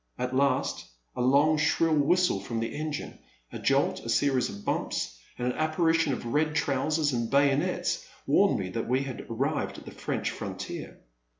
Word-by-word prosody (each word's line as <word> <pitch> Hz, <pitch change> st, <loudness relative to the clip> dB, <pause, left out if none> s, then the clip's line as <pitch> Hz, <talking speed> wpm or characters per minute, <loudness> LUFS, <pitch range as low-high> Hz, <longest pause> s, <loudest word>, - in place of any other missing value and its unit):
At 125 Hz, +1 st, -2 dB
last, 140 Hz, 0 st, +1 dB, 0.3 s
a 125 Hz, -, -2 dB
long, 145 Hz, +5 st, +4 dB
shrill 160 Hz, +1 st, +2 dB
whistle 175 Hz, +5 st, +3 dB
from 115 Hz, -1 st, -4 dB
the 115 Hz, -, -3 dB
engine, 155 Hz, 0 st, -4 dB, 0.3 s
a -, -, -6 dB
jolt, -, -, +2 dB
a 115 Hz, -, -8 dB
series 130 Hz, +1 st, +2 dB
of 100 Hz, 0 st, -9 dB
bumps, -, -, -2 dB, 0.2 s
and 125 Hz, -, -3 dB
an 125 Hz, -, +1 dB
apparition 160 Hz, 0 st, +2 dB
of 125 Hz, -, -3 dB
red 150 Hz, +5 st, +1 dB
trousers 145 Hz, +1 st, +1 dB
and 120 Hz, -2 st, -1 dB
bayonets 140 Hz, +5 st, +2 dB, 0.2 s
warned -, -, +4 dB
me 95 Hz, -2 st, -3 dB
that 115 Hz, +3 st, -3 dB
we 130 Hz, +2 st, +1 dB
had 135 Hz, -2 st, -7 dB
arrived 135 Hz, +6 st, -1 dB
at -, -, -11 dB
the -, -, -8 dB
French -, -, -3 dB
frontier. -, -, -6 dB
140 Hz, 175 wpm, -28 LUFS, 125-155 Hz, 0.3 s, long